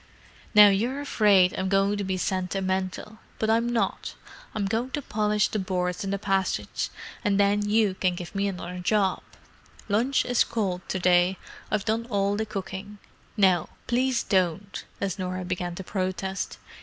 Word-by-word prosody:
"Now 210 Hz, -1 st, +10 dB
you're 235 Hz, +8 st, 0 dB
afraid 205 Hz, -9 st, +4 dB
I'm 185 Hz, 0 st, -1 dB
going 195 Hz, +1 st, +2 dB
to -, -, -1 dB
be 190 Hz, -1 st, -1 dB
sentimental, 190 Hz, +3 st, -2 dB, 0.2 s
but 220 Hz, 0 st, +1 dB
I'm 230 Hz, +1 st, +2 dB
not. 235 Hz, -1 st, -1 dB, 0.4 s
I'm 210 Hz, -2 st, 0 dB
going 225 Hz, +6 st, -1 dB
to 290 Hz, -, -1 dB
polish 210 Hz, -1 st, +1 dB
the 215 Hz, -, -2 dB
boards 180 Hz, -1 st, -2 dB
in 195 Hz, -, -3 dB
the 200 Hz, -, 0 dB
passage, 195 Hz, -1 st, -1 dB, 0.3 s
and 205 Hz, -3 st, +2 dB
then 205 Hz, +1 st, +2 dB
you 210 Hz, -2 st, +3 dB
can 185 Hz, -1 st, 0 dB
give 175 Hz, -1 st, -7 dB
me 200 Hz, 0 st, 0 dB
another 180 Hz, -2 st, -5 dB
job. 195 Hz, +1 st, +1 dB, 0.7 s
Lunch 235 Hz, +6 st, +2 dB
is 245 Hz, -1 st, +3 dB
cold 190 Hz, -5 st, -2 dB
to -, -, -1 dB
day: 180 Hz, 0 st, +3 dB, 0.3 s
I've 215 Hz, -2 st, -1 dB
done 230 Hz, +1 st, -1 dB
all 200 Hz, -2 st, +1 dB
the 220 Hz, +1 st, -2 dB
cooking. 200 Hz, 0 st, -6 dB, 0.4 s
Now, 185 Hz, -5 st, +3 dB, 0.2 s
please 255 Hz, 0 st, +1 dB
don't—" 190 Hz, 0 st, 0 dB
as 195 Hz, -1 st, -2 dB
Norah 185 Hz, 0 st, -3 dB
began 180 Hz, -1 st, -3 dB
to 190 Hz, -, -6 dB
protest. 190 Hz, 0 st, -3 dB
195 Hz, 165 wpm, -26 LUFS, 185-215 Hz, 0.7 s, Now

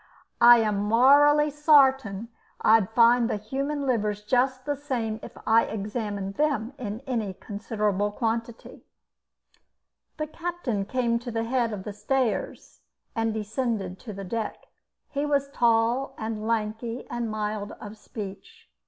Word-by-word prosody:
I 240 Hz, 0 st, +9 dB
am 215 Hz, -3 st, +1 dB
morally 285 Hz, +8 st, +5 dB
sartin 270 Hz, -8 st, +3 dB, 0.3 s
I'd 220 Hz, -3 st, +4 dB
find 235 Hz, +1 st, +4 dB
the -, -, 0 dB
human 275 Hz, +7 st, -3 dB
livers 210 Hz, -5 st, 0 dB
just 255 Hz, +3 st, +1 dB
the 290 Hz, 0 st, -1 dB
same 240 Hz, -6 st, -3 dB
if -, -, -11 dB
I 225 Hz, +1 st, +4 dB
examined 205 Hz, -2 st, -4 dB
them 280 Hz, -5 st, 0 dB
in 220 Hz, -1 st, -5 dB
any 230 Hz, -8 st, -3 dB
considerable 205 Hz, -1 st, -2 dB
quantity." 230 Hz, +1 st, -4 dB, 1.3 s
The 305 Hz, -, -2 dB
captain 310 Hz, -, -3 dB
came 235 Hz, +1 st, 0 dB
to 240 Hz, +1 st, -7 dB
the 225 Hz, -1 st, -2 dB
head 235 Hz, -1 st, 0 dB
of 200 Hz, -3 st, -5 dB
the 210 Hz, -, -6 dB
stairs 225 Hz, +2 st, -2 dB, 0.3 s
and 225 Hz, -1 st, 0 dB
descended 215 Hz, -3 st, -3 dB
to 225 Hz, -, -8 dB
the 195 Hz, -1 st, -7 dB
deck. 225 Hz, +3 st, -4 dB, 0.5 s
He 285 Hz, 0 st, -1 dB
was 285 Hz, -1 st, 0 dB
tall 235 Hz, +1 st, +2 dB
and 220 Hz, -1 st, -4 dB
lanky 225 Hz, +2 st, -2 dB
and 240 Hz, -1 st, -3 dB
mild 210 Hz, -1 st, -3 dB
of 210 Hz, 0 st, -10 dB
speech. 205 Hz, -2 st, -10 dB
230 Hz, 135 wpm, -26 LUFS, 210-260 Hz, 1.3 s, I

